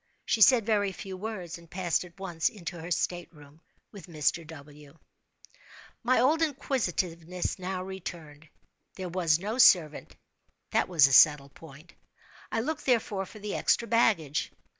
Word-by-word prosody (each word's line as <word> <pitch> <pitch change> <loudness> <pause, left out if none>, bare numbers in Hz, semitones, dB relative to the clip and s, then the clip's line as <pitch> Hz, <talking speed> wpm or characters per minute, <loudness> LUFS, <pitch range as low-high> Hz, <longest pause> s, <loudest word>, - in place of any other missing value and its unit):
She 220 - 0
said 235 -1 +6
very 205 -3 +1
few 190 0 -8
words, 185 -4 -6
and 170 -1 -18
passed 180 -2 -1
at 180 +1 -16
once 175 -4 -1
into 175 -4 -8
her 165 - -8
state 175 0 -2
room 150 -1 -18 0.3
with 200 -3 -12
Mr. 160 0 -1
W. 150 -1 -14 1.0
My 250 +1 +2
old 300 +7 +3
inquisitiveness 180 - -2
now 185 0 -4
returned. 165 -5 -9 0.5
There 185 -2 -6
was 170 -3 +1
no 210 +7 -5
servant—that 165 - +1
was 165 -6 +5
a 135 - +1
settled 140 0 +5
point. 160 +2 -15 0.6
I 225 - 0
looked, 300 +4 -4
therefore, 215 -6 0
for 215 - -13
the 210 0 -6
extra 235 - +1
baggage. 205 -10 +1
180 Hz, 145 wpm, -28 LUFS, 160-210 Hz, 1.0 s, said